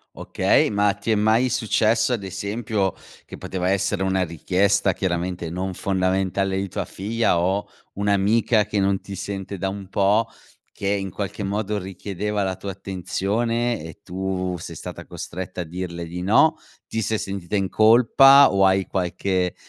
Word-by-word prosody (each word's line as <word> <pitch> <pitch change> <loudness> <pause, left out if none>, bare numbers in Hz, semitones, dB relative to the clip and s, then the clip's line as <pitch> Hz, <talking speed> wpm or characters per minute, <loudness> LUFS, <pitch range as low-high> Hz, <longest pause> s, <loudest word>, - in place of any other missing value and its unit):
Okay, - - +2
ma 100 -1 +2
ti 105 +2 -3
è - - +4
mai 110 +4 +3
successo, 110 +1 +2
ad 110 -5 -2
esempio, 100 0 -2 0.3
che - - -10
poteva 90 -1 -3
essere 100 0 0
una 95 0 +1
richiesta, 95 +4 +1
chiaramente 85 -2 -2
non 90 +1 -3
fondamentale, 95 +1 0
di 100 +1 -2
tua - - -3
figlia 110 -2 0
o 95 +4 0 0.2
un'amica 105 +2 +2
che 105 0 -2
non 95 0 +1
ti 100 +1 -9
sente 95 0 -5
da 95 - -1
un 100 0 -7
pò 100 +3 +2 0.5
che 100 - -5
in 100 -1 -1
qualche 100 +2 -4
modo 105 +1 -2
richiedeva 100 +2 -4
la 95 -1 -1
tua 100 +2 -6
attenzione 105 +4 -2
e 80 +3 -10
tu 95 -1 -3
sei 80 - -8
stata - - -8
costretta 90 +1 -6
a - - -2
dirle 85 0 -6
di 90 +2 -5
no, 155 - +4 0.3
ti 110 - -2
sei 110 0 -1
sentita 95 -1 -4
in 95 -2 0
colpa, 125 +5 +6
o 95 0 +3
hai 95 -1 +2
qualche, 90 0 -1
95 Hz, 160 wpm, -23 LUFS, 95-105 Hz, 0.5 s, colpa